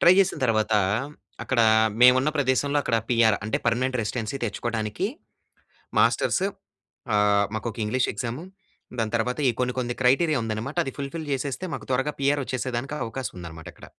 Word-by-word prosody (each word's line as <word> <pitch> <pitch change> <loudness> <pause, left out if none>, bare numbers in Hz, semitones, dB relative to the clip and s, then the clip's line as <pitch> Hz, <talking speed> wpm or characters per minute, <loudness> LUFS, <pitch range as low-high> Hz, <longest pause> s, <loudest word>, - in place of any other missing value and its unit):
Try 175 - +7
చేసిన 195 -1 +3
తర్వాతా, 110 -2 +2 0.6
అక్కడ 130 -3 +1 0.4
మేవున్న 130 +3 +6
ప్రదేశంలో 140 +1 +1
అక్కడ 115 - +1
పీఆర్ 115 -3 +4
అంటే 110 - 0
పర్మనెంట్ 125 +2 +1
రెసిడెన్సీ 115 +4 -3
తెచ్చుకోడానికి 115 - -2 0.9
మాస్టర్స్ 185 - +2 0.7
ఆహ్, 105 0 +3
మాకొక 115 +1 -4
ఇంగ్లీషు 125 +4 0
ఎగ్జాము 120 +6 -4 0.6
దాని 110 -1 -1
తర్వాత 125 +4 -1
ఈ - - +3
కొన్ని 125 0 0
కొన్ని 120 -1 -2
క్రైటీరియా 140 +5 +3
ఉందనమాట. 115 +5 -4
అది 135 - -4
ఫుల్‌‌ఫిల్ 150 +3 -5
చేసేస్తే, 135 +6 -3
మాకు - - -10
త్వరగా 135 +4 0
పీఆర్ 140 +1 +2
వచ్చేసేదానికి 130 +2 -3
అవకాశం 130 +3 -5
ఉందనమాట 80 -1 -9
ఇక్కడ. - - -14
125 Hz, 145 wpm, -25 LUFS, 110-135 Hz, 0.9 s, Try